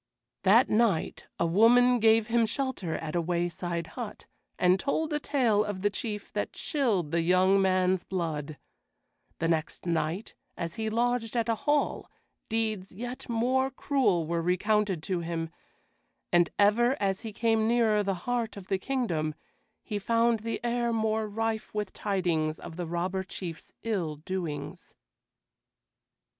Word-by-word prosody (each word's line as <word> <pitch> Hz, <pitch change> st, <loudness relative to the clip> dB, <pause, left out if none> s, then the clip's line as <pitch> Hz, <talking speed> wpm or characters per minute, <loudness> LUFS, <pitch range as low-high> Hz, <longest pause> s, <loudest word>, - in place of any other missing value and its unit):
That 220 Hz, +6 st, +6 dB
night 215 Hz, -7 st, +1 dB
a -, -, +2 dB
woman 240 Hz, +7 st, +5 dB
gave 225 Hz, 0 st, +5 dB
him 230 Hz, 0 st, +2 dB
shelter 260 Hz, -, -2 dB
at 160 Hz, -1 st, -4 dB
a 175 Hz, -, +2 dB
wayside 170 Hz, 0 st, -2 dB
hut, 235 Hz, +3 st, -7 dB, 0.3 s
and 180 Hz, +1 st, +4 dB
told 305 Hz, +4 st, -1 dB
a 295 Hz, -, +1 dB
tale 240 Hz, -8 st, +2 dB
of 205 Hz, -3 st, -5 dB
the 205 Hz, -, +3 dB
Chief 210 Hz, -1 st, -5 dB
that -, -, -2 dB
chilled 220 Hz, -, 0 dB
the 170 Hz, -, +2 dB
young 185 Hz, +3 st, +4 dB
man's 185 Hz, -1 st, +2 dB
blood; 155 Hz, -5 st, -3 dB, 0.8 s
the 165 Hz, -, 0 dB
next 165 Hz, 0 st, -1 dB
night, 170 Hz, +3 st, -1 dB, 0.2 s
as 170 Hz, -2 st, -4 dB
he 220 Hz, -1 st, -2 dB
lodged 235 Hz, 0 st, 0 dB
at 230 Hz, -1 st, +1 dB
a 230 Hz, -, +2 dB
hall, 290 Hz, +6 st, 0 dB, 0.4 s
deeds 215 Hz, -4 st, -1 dB
yet 245 Hz, +6 st, -7 dB
more 255 Hz, +3 st, +1 dB
cruel 260 Hz, -, +1 dB
were 170 Hz, +1 st, -1 dB
recounted 190 Hz, 0 st, +1 dB
to 185 Hz, 0 st, -1 dB
him; 165 Hz, -1 st, -3 dB, 0.8 s
and 175 Hz, -1 st, +4 dB
ever 235 Hz, +6 st, +4 dB
as 195 Hz, -1 st, 0 dB
he 225 Hz, -2 st, -6 dB
came 220 Hz, 0 st, +1 dB
nearer 225 Hz, -3 st, +3 dB
the 195 Hz, -1 st, -1 dB
heart 235 Hz, -4 st, -1 dB
of 195 Hz, -2 st, -10 dB
the 195 Hz, -1 st, +1 dB
kingdom, 175 Hz, -, -1 dB, 0.5 s
he 210 Hz, -, -3 dB
found 230 Hz, +2 st, +2 dB
the 230 Hz, +2 st, -3 dB
air 240 Hz, 0 st, 0 dB
more 220 Hz, -1 st, 0 dB
rife 220 Hz, +1 st, -2 dB
with 210 Hz, -2 st, -2 dB
tidings 170 Hz, -6 st, -1 dB
of 165 Hz, -, -9 dB
the 175 Hz, -1 st, -4 dB
Robber 180 Hz, +3 st, -2 dB
Chief's 180 Hz, -3 st, -7 dB
ill 185 Hz, -9 st, -1 dB
doings. 155 Hz, -2 st, -5 dB
205 Hz, 150 wpm, -29 LUFS, 175-230 Hz, 0.8 s, That